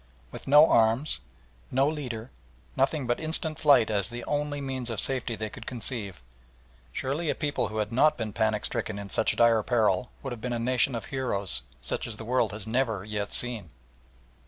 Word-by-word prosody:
With - - -10
no 150 +3 +8
arms, 115 +6 +3 0.5
no 135 +2 +3
leaders, 130 -6 -4 0.5
nothing 135 +1 +1
but 120 0 0
instant 160 0 -1
flight 140 -8 +5
as 100 -3 0
the 120 0 -6
only 145 0 -1
means 130 -3 -3
of 115 - -2
safety 130 -3 -2
they 110 0 -5
could 115 -4 -10
conceive, 105 - -4 0.7
surely 145 - -2
a - - +1
people 145 -2 -1
who 110 - -6
had 105 -1 -1
not 145 +6 +4
been 110 -3 -4
panic 110 0 +1
stricken 110 - -2
in 100 -1 -7
such 110 - +2
dire 115 -1 +5
peril 110 -1 +2
would 135 - -4
have 115 - -9
been 125 0 -2
a - - 0
nation 125 +2 +1
of 115 - -4
heroes 100 - 0 0.2
such 65 - -3
as 110 -3 -7
the 110 - -8
world 120 -2 +1
has 105 -1 -6
never 110 -4 0
yet 105 -1 -3
seen! 120 -8 -1
120 Hz, 190 wpm, -28 LUFS, 110-135 Hz, 0.7 s, no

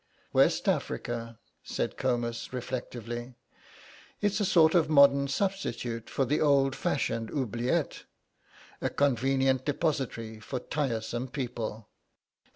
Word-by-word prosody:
"West - - +3
Africa," 115 -1 -2 0.3
said - - -2
Comus, 120 -3 -1
reflectively; 120 -1 -5 0.8
"it's 205 0 +1
a 205 - +1
sort 160 -3 +5
of 170 -4 +3
modern 140 -2 +6
substitute 125 - -2
for 135 - 0
the 150 +4 +1
old 140 -3 +4
fashioned 115 -5 -1
oubliette, 120 -2 -1 0.8
a - - 0
convenient 135 -1 +2
depository 135 -7 -2
for 125 +4 -4
tiresome 120 -3 -2
people. 120 -5 -4
130 Hz, 105 wpm, -29 LUFS, 120-140 Hz, 0.8 s, modern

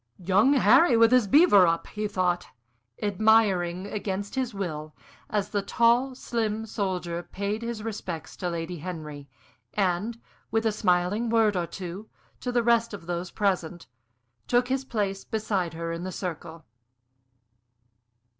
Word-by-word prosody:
"'Young 195 +9 +3
Harry 250 - +5
with 230 0 +6
his 250 -4 +4
beaver 205 - +6
up!'" 165 0 0
he 210 0 -4
thought, 180 - 0 0.6
admiring 200 -4 +2
against 200 -1 -4
his 260 -2 -1
will, 155 -7 -5 0.3
as 210 -2 -1
the 205 - -1
tall, 235 +5 +2
slim 225 -3 -2
soldier 185 -5 -3
paid 200 +5 -4
his 230 -2 -4
respects 185 -8 -6
to 180 - -2
Lady 170 0 -4
Henry, 150 -4 -7 0.5
and, 200 +4 0 0.3
with 225 +1 0
a 220 - +3
smiling 205 +2 +1
word 220 -3 +3
or 175 -2 -1
two 185 +4 -7 0.3
to 250 - -3
the 240 -1 +2
rest 230 -2 +2
of 185 - -12
those 175 +1 -3
present, 180 -5 -1 0.6
took 245 +1 +2
his 265 0 0
place 200 -6 -2
beside 205 -7 -2
her 165 0 -4
in 165 +1 -4
the 185 - -4
circle. 165 -3 -6
200 Hz, 145 wpm, -26 LUFS, 175-225 Hz, 0.6 s, with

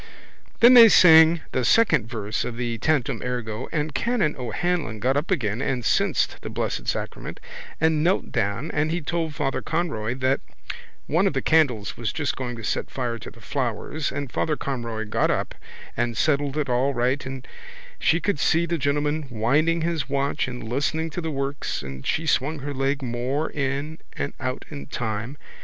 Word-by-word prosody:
Then 240 +2 +9
they 235 -2 +10
sang 160 -3 +7
the 130 - 0
second 155 - +3
verse 110 -3 -2
of 120 -1 -5
the 120 -2 -2
Tantum 135 -6 0
ergo 120 -2 -4
and 150 -1 -2
Canon 210 - 0
O'Hanlon 135 +1 -2
got 130 +5 +1
up 145 +5 -1
again 120 - 0
and 130 -3 -1
censed - - +1
the - - -6
Blessed - - -3
Sacrament - - -4 0.4
and 160 -1 +2
knelt 180 +3 +1
down 115 +7 -1
and 150 +1 0
he 170 +2 0
told 160 -1 -2
Father 135 -1 -1
Conroy 150 -9 -2
that 130 +1 +1 0.7
one 175 +6 +2
of 190 - 0
the 135 - 0
candles 130 -11 +2
was 115 -4 -2
just 145 -3 -2
going 125 -2 -4
to 115 - -9
set 105 - -2
fire 120 -3 -3
to - - -8
the 115 - -17
flowers 130 +5 -2
and 140 -2 -4
Father 155 +4 0
Conroy 115 -5 -3
got 105 - +1
up - - -1 0.4
and 120 -1 -1
settled 145 0 +1
it 150 -2 0
all 130 +2 +1
right 125 +4 +1
and 130 -1 -7 0.5
she 165 - +3
could 180 -3 -1
see 165 +3 +3
the 170 -1 -2
gentleman 145 +2 0
winding 145 +9 +2
his 160 -5 -1
watch 140 -1 0
and 125 -3 -6
listening 155 +6 -1
to 175 - -4
the 160 - -3
works 140 - -3
and 65 0 -7
she 165 - 0
swung 155 +1 +1
her 145 +1 -5
leg 135 +1 -1
more 125 +5 -2
in 140 +3 -3 0.2
and 140 - -3
out 130 -2 -3
in 145 -2 -7
time. 115 +1 -4
140 Hz, 185 wpm, -24 LUFS, 120-155 Hz, 0.7 s, they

